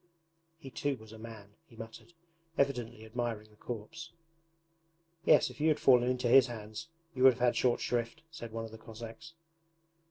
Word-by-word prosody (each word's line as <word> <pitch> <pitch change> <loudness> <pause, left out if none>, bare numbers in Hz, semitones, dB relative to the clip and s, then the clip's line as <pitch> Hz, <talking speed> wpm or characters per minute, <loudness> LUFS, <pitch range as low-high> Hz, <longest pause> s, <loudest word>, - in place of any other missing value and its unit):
'He 140 -5 -11
too 140 +1 -1
was 110 -1 -14
a 110 - -11
man!' 110 -3 -10
he 115 - -18
muttered, 115 +9 -10 0.4
evidently 120 -5 0
admiring 110 -2 -4
the - - -21
corpse. 120 +10 -7 1.1
'Yes, 155 - +5
if - - -11
you 155 - +3
had 155 - +3
fallen 125 -2 +5
into 125 -1 0
his 130 +2 +7
hands 110 +3 -7 0.3
you 130 - -5
would 130 0 +9
have 125 - -13
had 125 0 +3
short 125 -2 +2
shrift,' 120 +4 -2
said 120 -8 -8
one 115 0 -4
of 110 - -10
the 110 - -11
Cossacks. 115 +8 -10
120 Hz, 180 wpm, -32 LUFS, 110-130 Hz, 1.1 s, would